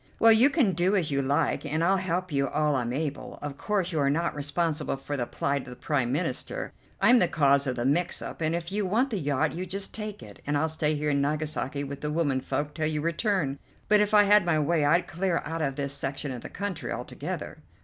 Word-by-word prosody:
"Well, 225 - +7
you 230 +5 +6
can 275 - +2
do 180 +4 +2
as 170 -6 +1
you 140 0 +1
like, 140 +3 0
and 155 +2 -1
I'll 190 +3 +3
help 185 -1 -2
you 140 -1 +1
all 150 0 +1
I'm 120 -2 -1
able. 145 +1 -4
Of 145 -1 -4
course 190 +3 -1
you're 145 -4 +1
not 165 +4 0
responsible 150 +1 -1
for 145 +2 -5
the 120 -3 -2
plight 140 0 -1
of 130 - -11
the 125 - -8
Prime 130 -3 -1
Minister; 145 -2 -2 0.3
I'm 240 +5 +6
the 180 - +4
cause 140 -3 +3
of 130 - -1
the 120 0 -2
mix 165 +6 +2
up, - - -7
and 160 +1 +1
if 170 +1 -4
you 210 +1 0
want 230 +8 +1
the 210 - -1
yacht 145 -4 0
you 185 +2 -4
just 195 +2 -4
take 210 - -6
it, 105 -2 -13
and 145 0 +1
I'll 160 +2 +1
stay 155 -1 0
here 150 0 0
in 140 -1 +1
Nagasaki 150 -1 -2
with 140 0 -7
the 150 - -2
womenfolk 145 -1 -1
till 155 +1 -1
you 155 -1 -1
return; 165 - 0 0.3
but 210 0 +6
if 210 0 +2
I 210 -1 +7
had 205 0 +5
my 170 -2 +2
way 155 +1 +1
I'd 165 +5 +3
clear 175 0 -1
out 165 +1 -3
of 135 -3 -1
this 140 -1 -2
section 140 0 -3
of 125 -2 -6
the - - -8
country 200 -3 -4
altogether." - - -5
155 Hz, 240 wpm, -27 LUFS, 140-185 Hz, 0.3 s, Well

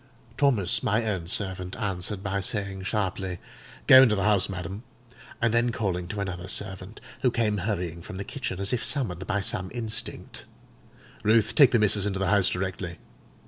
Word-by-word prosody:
Thomas, 120 -11 +3
my 110 +2 +1
own 95 -6 -2
servant, 95 -1 -2
answered 100 -2 -3
by 100 -1 -1
saying 100 -1 -2
sharply, 95 -3 -2 0.5
'Go 130 0 +10
into 115 -5 +5
the 100 - -1
house, 105 -1 +3
madam.' 95 +2 -6 0.6
And 115 -1 +1
then 120 +1 +2
calling 95 -7 -2
to 100 +3 -5
another 90 -2 -5
servant, 95 +2 -3 0.2
who 130 - +3
came 110 -4 0
hurrying 90 -4 -3
from 95 +3 -9
the 100 - -4
kitchen 100 -6 -5
as 100 +3 +1
if 120 - -1
summoned 95 - -2
by 105 -1 0
some 95 -1 -1
instinct, 115 -3 -3 0.8
'Ruth, 110 +1 +3
take 135 -5 +6
missis 105 -2 +3
into 95 -1 -2
the 95 -1 0
house 100 -2 +3
directly. 90 -2 -4
100 Hz, 170 wpm, -26 LUFS, 95-110 Hz, 0.8 s, Go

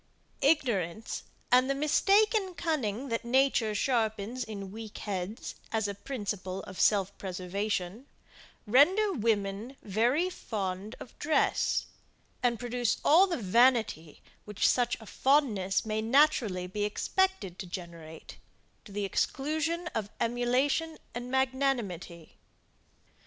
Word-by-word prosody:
Ignorance 225 - 0 0.3
and 255 +2 +5
the 275 - +1
mistaken 390 - +3
cunning 270 -7 -2
that 230 0 -1
nature 240 -3 +2
sharpens 225 0 0
in 200 -3 -7
weak 220 0 -8
heads, 200 +2 -4 0.2
as 220 -2 0
a 200 - -3
principle 200 -5 -4
of 185 - -9
self 200 -2 +3
preservation, 190 +4 -3 0.6
render 365 - +4
women 215 - -1
very 240 - +1
fond 200 - -4
of 245 - -11
dress, 310 +1 +1 0.6
and 240 -2 +1
produce 245 -1 -1
all 350 +6 +7
the 345 - -2
vanity 225 - +2 0.2
which 210 -1 0
such 245 -1 +2
a 220 - -12
fondness 220 -8 +1
may 215 0 -1
naturally 230 -7 +3
be 205 +3 -3
expected 210 - 0
to 190 - -6
generate, 170 -3 -9 0.5
to - - -12
the 205 0 -2
exclusion 315 - -1
of 210 -2 -2
emulation 255 +7 0 0.2
and 245 +1 -5
magnanimity. 250 - -1
225 Hz, 115 wpm, -30 LUFS, 200-270 Hz, 0.6 s, all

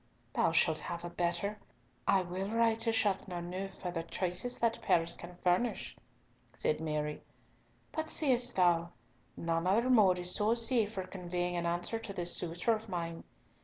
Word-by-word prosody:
"Thou - - +2
shalt 155 -1 +3
have 170 +1 -5
a 175 - -6
better. 175 +4 -1 0.5
I 190 -1 +4
will 185 +3 -4
write 225 0 +2
to 230 0 +1
Chateauneuf 190 -3 -2
for 180 - -5
the 165 -1 -2
choicest 185 +8 -3
that 230 0 +1
Paris 170 -6 +2
can 175 +1 -10
furnish," 185 +7 +1 0.6
said 155 - 0
Mary, 150 -1 -2 0.7
"but 315 0 -3
seest 250 -4 +3
thou, 170 -2 +3 0.4
none 165 +1 -1
other 230 +7 +3
mode 200 -7 +5
is 180 0 0
so 215 +2 +2
safe 230 -2 +3
for 190 -3 -4
conveying 180 -1 -3
an 170 0 -1
answer 175 +6 -1
to 215 -3 -6
this 175 -2 0
suitor 175 +6 0
of 220 0 -5
mine! 170 -2 -4
180 Hz, 165 wpm, -33 LUFS, 175-225 Hz, 0.7 s, mode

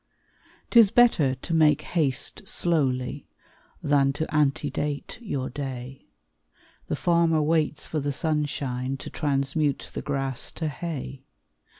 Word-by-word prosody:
'Tis 230 -4 +7
better 180 - +4
to 135 +6 -6
make 155 -2 +4
haste 155 +4 0
slowly, 140 -7 0 0.6
Than 140 -1 +3
to 155 +3 -2
antedate 145 +2 -1
your 140 - -3
day; 130 -1 -7 0.8
The - - -1
farmer 170 -2 +2
waits 155 -1 +1
for 155 - -2
the 145 0 -1
sunshine, 140 -4 -2
To - - -8
transmute 145 0 -1
the - - -4
grass 135 -3 -1
to 160 -2 -3
hay. 145 -3 -6
145 Hz, 115 wpm, -26 LUFS, 135-160 Hz, 0.8 s, Tis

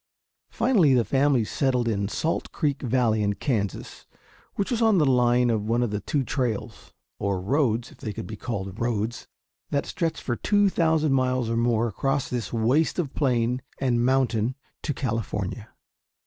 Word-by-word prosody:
Finally 200 - +3
the 120 -2 +3
family 135 -3 +2
settled 125 0 0
in 100 -3 0
Salt 160 +10 -2
Creek 145 -3 -1
Valley 120 -4 +1
in 100 -1 +1
Kansas, 105 -7 -3 0.5
which 200 +5 -2
was 235 -1 0
on 220 -3 +4
the 155 - +4
line 125 -2 +3
of 110 -2 0
one 120 +1 +2
of 120 - -1
the 105 - -1
two 140 +5 -1
trails, 125 -5 -3 0.3
or 100 -2 -1
roads 120 +2 0
if - - -18
they 110 - -4
could 100 - -6
be 110 - -7
called 100 -4 -5
roads 115 -1 -2 0.4
that 140 - 0
stretched 165 -3 -2
for 120 - -1
two 205 - +2
thousand 160 -5 +2
miles 130 -3 +1
or - - 0
more 115 0 +2
across 135 +5 -1
this 120 -6 -3
waste 120 +8 +1
of 155 -6 -2
plain 125 -3 +1 0.2
and 120 -3 +1
mountain 125 -2 +1 0.3
to 150 - -2
California. 115 -4 -3
125 Hz, 170 wpm, -25 LUFS, 115-140 Hz, 0.5 s, on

